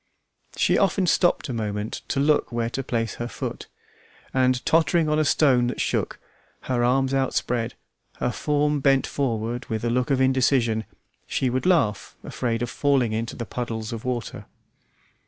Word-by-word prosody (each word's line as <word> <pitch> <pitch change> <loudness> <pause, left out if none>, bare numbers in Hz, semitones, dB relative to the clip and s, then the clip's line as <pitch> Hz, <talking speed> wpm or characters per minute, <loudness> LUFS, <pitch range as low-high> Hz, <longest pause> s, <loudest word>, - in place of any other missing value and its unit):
She - - +3
often 195 -1 +2
stopped 175 0 +2
a 130 - -4
moment 105 -1 -3
to - - -1
look 145 -1 +2
where 115 0 -1
to 135 - -2
place 115 -3 -2
her 120 - -2
foot, - - -6 0.7
and 130 -1 +2
tottering 165 0 +3
on 150 0 +2
a - - +3
stone 130 -5 +3
that 125 - -4
shook, - - -1 0.4
her 125 -2 -1
arms 135 +2 +2
outspread, 125 -3 0 0.4
her 125 - -1
form 150 +2 0
bent 135 -1 +3
forward 120 -3 -2
with 110 +1 -3
a 120 - +1
look 125 +2 0
of 135 -2 +2
indecision, 130 -4 +2 0.4
she 130 -2 0
would 130 +7 -1
laugh, 130 - +1
afraid 115 -1 -2
of 120 - -3
falling 135 -6 +1
into 115 +1 -3
the 115 - -5
puddles 115 -2 -4
of 115 0 -6
water. 125 -3 -4
125 Hz, 165 wpm, -24 LUFS, 115-140 Hz, 0.7 s, She